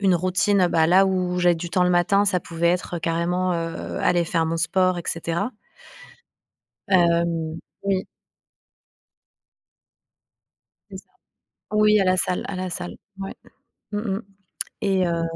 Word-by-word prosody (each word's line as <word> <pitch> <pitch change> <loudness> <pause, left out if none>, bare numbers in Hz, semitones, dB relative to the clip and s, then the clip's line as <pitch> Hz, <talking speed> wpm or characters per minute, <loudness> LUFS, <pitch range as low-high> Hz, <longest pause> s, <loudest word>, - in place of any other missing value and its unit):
routine, 185 +3 +2
heu 180 - +4
bah 160 -2 +3
,là 190 +3 +6
où 180 -1 0
j'ai 175 -1 +4
du 170 +1 -6
temps 180 +1 +2
le 180 - +2
matin, 195 +3 +3
ça 185 -3 +2
pouvait 170 0 -1
être 175 -1 -1
carrément, 175 +2 0
heu, 165 0 -4
aller 175 -1 +3
faire 165 0 0
mon 165 +1 -1
sport 185 +3 +1
et 170 - -8
cetera. 170 +8 -2 1.3
Hem, 170 -3 +2 0.2
oui. 195 -1 0 2.9
C'est - - -7
ça. - - -15 0.6
Oui, 210 0 +4
à 195 - +2
la 185 0 +3
salle 180 - 0
à 200 - -4
la 185 0 -3
salle, 175 0 -5 0.2
ouais. 195 0 -6 0.6
Mmh 205 - -2
mh. 205 -1 -2 0.6
Et 190 -2 +2
heu 170 -1 -1
180 Hz, 145 wpm, -23 LUFS, 170-190 Hz, 2.9 s, là